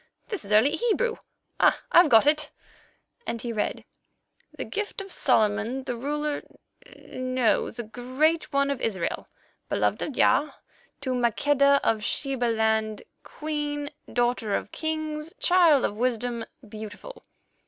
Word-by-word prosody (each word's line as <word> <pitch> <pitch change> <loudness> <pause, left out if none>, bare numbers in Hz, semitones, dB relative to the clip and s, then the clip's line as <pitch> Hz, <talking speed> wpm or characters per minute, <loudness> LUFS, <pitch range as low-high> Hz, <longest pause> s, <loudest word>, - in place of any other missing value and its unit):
this 415 -5 -3
is 200 - -8
early 220 +7 +5
Hebrew. 460 +6 0 0.4
Ah! - - +4
I've 345 -2 +7
got 225 -1 +6
it," 300 0 +3 0.8
and 230 - -2
he 235 0 -4
read: 210 - -2 0.7
"'The - - -4
gift 420 +1 -4
of 390 -1 -7
Solomon 225 -1 +1
the 255 -2 -3
ruler—no, 255 -3 -3
the 240 - -7
Great 260 +9 0
One—of 280 -1 0
Israel, 190 -6 -2 0.4
Beloved - - 0
of 300 - -3
Jah, 275 +3 +2 0.5
to 260 -2 -2
Maqueda 280 +4 +3
of 220 -2 +1
Sheba 270 +1 0
land, 220 -2 0 0.2
Queen, 295 -1 -4 0.2
Daughter 240 -4 0
of - - -4
Kings, 310 0 -4
Child 350 - +5
of 205 - -3
Wisdom, 240 -1 -1 0.2
Beautiful. 215 - -9
260 Hz, 125 wpm, -26 LUFS, 230-300 Hz, 0.8 s, I've